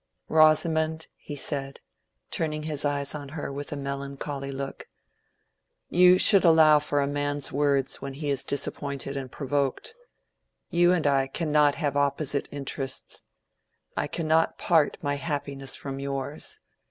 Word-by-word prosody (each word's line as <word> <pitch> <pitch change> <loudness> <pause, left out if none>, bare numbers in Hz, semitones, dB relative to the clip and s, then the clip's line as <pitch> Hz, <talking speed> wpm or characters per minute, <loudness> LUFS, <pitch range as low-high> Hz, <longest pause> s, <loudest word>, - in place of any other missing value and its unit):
"Rosamond," 160 0 +3
he 145 - -8
said, 140 -1 -3 0.5
turning 155 -2 -2
his 150 -2 -2
eyes 140 -1 -1
on 145 -2 -7
her 145 -2 -5
with 140 0 -5
a - - -2
melancholy 140 0 -5
look, 135 0 -6 1.0
"you 180 +1 +7
should 195 +1 +5
allow 160 -3 +7
for 145 -1 0
a - - +1
man's 145 0 -1
words 140 -1 +1
when 140 -1 -6
he 145 0 -2
is 140 - 0
disappointed 140 -1 -2
and 135 -2 -5
provoked. 140 - -2 0.8
You 175 +1 +4
and 175 -4 +1
I 135 -2 +3
cannot 150 0 +2
have 145 -3 -1
opposite 140 0 0
interests. 135 -1 -5 0.7
I - - -1
cannot 160 0 +1
part 160 -4 +2
my 145 -1 0
happiness 140 -2 -3
from 135 -1 -6
yours. 140 +1 -4
145 Hz, 140 wpm, -26 LUFS, 140-155 Hz, 1.0 s, you